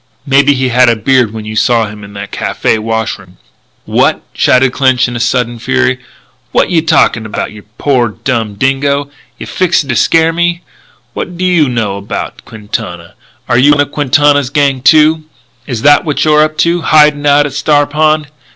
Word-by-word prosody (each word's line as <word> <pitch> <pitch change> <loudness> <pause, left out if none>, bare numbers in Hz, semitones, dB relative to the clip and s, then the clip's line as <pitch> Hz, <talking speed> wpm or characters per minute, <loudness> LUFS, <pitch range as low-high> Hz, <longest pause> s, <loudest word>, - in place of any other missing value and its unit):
Maybe 140 0 +3
he 130 -1 -1
had 125 0 +3
a 115 - +2
beard 120 +1 +1
when 110 -1 -8
you 110 0 -6
saw 115 +1 +2
him 105 0 -10
in 100 0 -12
that 100 0 -8
café 110 - -1
wash 110 0 -3
room 90 -1 -18 0.3
" - - -42
"What!" - - 0
shouted 125 0 +2
Clinch 130 -3 +1
in 120 0 -5
sudden 120 0 -1
fury. 130 +1 0 0.5
"What - - +1
yeh 165 -2 +2
talkin' 155 -8 +1
about, 110 - -5
you 105 -1 -13
poor 125 -5 +1
dumb 110 -1 -3
dingo! 140 +4 -1 0.3
Yeh - - -8
fixin' 175 -6 -1
to 120 - 0
scare 165 +6 +2
me? 170 +1 -1 0.5
What 180 - -6
do 185 - -2
you 170 -6 +2
know 110 -5 -2
about 100 +1 -6
Quintana? 90 -6 -7 0.3
Are 120 - +2
you 145 +3 +5
one 145 - +2
of 145 - -3
Quintana's 145 -1 +1
gang, 140 -2 0
too? 155 +3 +3 0.4
Is 120 -3 -4
that 145 0 +5
what 150 -3 -1
you're 150 -1 +4
up 155 0 0
to, 170 +1 0
hidin' 150 -2 +3
out 145 +1 +4
at 145 - -5
Star 145 0 +1
Pond. 155 +1 0
135 Hz, 190 wpm, -11 LUFS, 115-150 Hz, 0.5 s, you